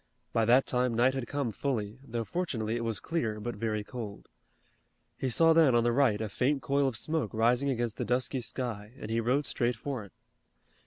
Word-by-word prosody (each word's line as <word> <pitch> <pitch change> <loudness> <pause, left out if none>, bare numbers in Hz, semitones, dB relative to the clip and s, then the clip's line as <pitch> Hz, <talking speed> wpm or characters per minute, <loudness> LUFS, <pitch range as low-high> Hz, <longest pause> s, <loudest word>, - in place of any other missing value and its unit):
By 115 - +3
that 125 +4 +5
time 125 -1 +1
night 125 +3 +4
had 130 -3 -3
come 140 -5 -1
fully, 110 -1 -2
though 120 -3 -3
fortunately 115 -8 -2
it 120 - -2
was 115 -2 -2
clear 115 -11 -2
but 120 +3 -4
very 110 0 -2
cold. 110 -3 -7 0.9
He 130 - -2
saw 165 +7 +5
then 160 -6 +5
on 120 - +4
the 120 - +3
right 120 -5 +3
a 110 - -2
faint 135 +7 0
coil 140 0 +2
of 125 -4 -2
smoke 155 -3 -1
rising 120 +5 +3
against 120 -4 -1
the - - -1
dusky 125 +2 0
sky 115 -3 -4
and 110 - -6
he 115 - +1
rode 130 +6 +1
straight 120 -1 0
for 130 0 -4
it. 100 - -14
120 Hz, 205 wpm, -30 LUFS, 110-135 Hz, 0.9 s, that